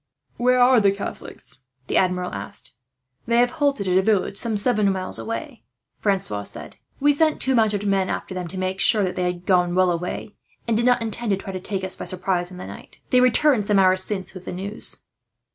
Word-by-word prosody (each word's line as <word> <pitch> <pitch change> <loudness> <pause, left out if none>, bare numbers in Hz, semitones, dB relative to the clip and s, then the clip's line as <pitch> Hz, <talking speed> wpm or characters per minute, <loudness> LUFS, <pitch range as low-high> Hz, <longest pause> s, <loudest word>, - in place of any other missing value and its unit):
"Where 250 +1 +3
are 250 0 +6
the 200 -2 +4
Catholics?" 200 -8 -8 0.3
the - - -3
Admiral 180 -1 +1
asked. 100 0 -5 0.6
"They 235 0 +2
have 245 0 +3
halted 280 -9 0
at 185 0 +3
a - - +3
village, 200 -1 +1
some 225 0 0
seven 210 -2 +2
miles 185 -1 -2
away," 245 +2 -6 0.4
Francois 195 - -1
said. 75 -6 -7 0.2
"We 290 +1 +4
sent 310 +1 +1
two 265 - +2
mounted 215 -4 +1
men 195 -2 +1
after - - -4
them, 180 -1 -4
to 185 - -8
make 185 +1 -2
sure 215 -1 +5
that 180 -1 -2
they - - -2
had 175 0 -11
gone 180 -2 +2
well 185 -1 +3
away, 180 +4 -4 0.3
and 230 - +1
did 235 +3 +1
not 245 -2 +3
intend 225 +1 -4
to 195 - +2
try 195 0 -7
to 185 - -4
take 190 +1 -4
us 190 - -3
by - - -7
surprise 180 -1 -1
in 180 - -10
the 180 - -7
night. - - -12
They 250 -1 +5
returned 250 -2 +3
some 205 -1 +2
hours 185 -1 +4
since 190 -2 -4
with 185 -1 -11
the - - -5
news." 200 +4 -2
195 Hz, 220 wpm, -22 LUFS, 185-235 Hz, 0.6 s, are